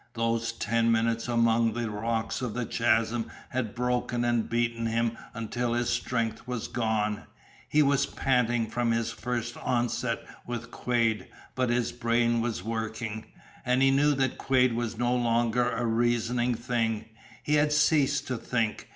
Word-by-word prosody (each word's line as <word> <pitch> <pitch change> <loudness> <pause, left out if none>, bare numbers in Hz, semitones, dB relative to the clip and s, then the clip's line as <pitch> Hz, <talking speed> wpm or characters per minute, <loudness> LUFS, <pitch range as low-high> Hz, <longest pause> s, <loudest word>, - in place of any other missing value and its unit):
Those 115 0 0
ten 115 +1 +1
minutes 115 +1 +1
among 115 -1 +3
the 120 0 -2
rocks 110 +3 -2
of 125 -4 -3
the 125 -1 -1
chasm 115 0 +1 0.2
had 120 -4 -3
broken 125 0 0
and 120 -2 +1
beaten 115 0 0
him 115 0 0 0.2
until 115 +1 -2
his 120 0 0
strength 115 -2 -2
was 125 -3 -3
gone. 110 -3 -1 0.4
He 150 0 +4
was 140 -1 +2
panting 120 -3 +1
from 115 +2 -1
his 115 0 0
first 120 0 -3
onset 120 -2 -1 0.3
with 120 -1 -5
Quade, 115 -5 0 0.3
but 130 -1 0
his 120 0 +1
brain 120 -1 +1
was 115 -5 -2
working. 110 0 -4 0.4
And 125 +2 +2
he 135 - +5
knew 145 +2 +3
that 130 -1 0
Quade 130 -2 +3
was 115 -1 -2
no 120 +1 +1
longer 120 0 +2
a 120 0 -2
reasoning 120 +1 +1
thing. 115 -2 -1 0.4
He 150 - 0
had 150 0 +3
ceased 145 -2 +3
to 130 -3 -2
think. 115 -2 -2
120 Hz, 155 wpm, -28 LUFS, 115-125 Hz, 0.4 s, he